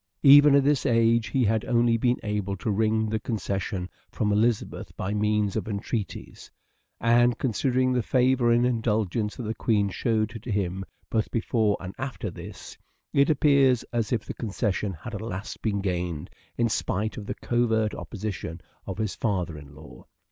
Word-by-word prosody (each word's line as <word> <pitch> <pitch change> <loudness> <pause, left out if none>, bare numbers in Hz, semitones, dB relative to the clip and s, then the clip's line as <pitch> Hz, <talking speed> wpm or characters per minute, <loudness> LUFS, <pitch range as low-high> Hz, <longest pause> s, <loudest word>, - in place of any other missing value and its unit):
Even 145 +1 +8
at 140 - +5
this 145 0 +2
age 115 -2 +3
he 125 +6 +1
had 110 0 +1
only 120 -1 +3
been 120 +2 +2
able 105 -2 -2
to 100 +3 -2
wring 110 +1 +1
the 110 0 -1
concession 100 -4 -3 0.2
from 105 -1 -1
Elizabeth 110 +2 0
by 100 +2 -2
means 105 -1 +1
of - - -2
entreaties; 105 0 -5 0.5
and, 120 +1 +4
considering 130 +1 +1
the 125 - +2
favour 125 0 +2
and 120 +1 +4
indulgence 110 -3 0
that 125 - -6
the 110 0 -2
Queen 105 -3 +1
showed 110 +1 0
to 120 - -9
him 95 -2 -1 0.3
both 110 -2 0
before 110 -2 +1
and 95 +1 -7
after 130 -6 -4
this, - - -10 0.4
it 140 +2 +4
appears 140 -4 +4
as 115 -2 -1
if 115 -4 0
the - - -5
concession 105 -2 -2
had 95 +7 -9
at 105 - -4
last 100 -3 -6
been 100 -3 -1
gained 90 -5 -3 0.3
in 120 - +2
spite 110 -1 -1
of 105 - -7
the - - -3
covert 110 -3 +1
opposition 95 -6 -5 0.3
of 95 - -4
his 110 -2 -2
father 90 -7 -2
in 75 -1 -12
law. 75 0 -13
110 Hz, 170 wpm, -26 LUFS, 100-120 Hz, 0.5 s, Even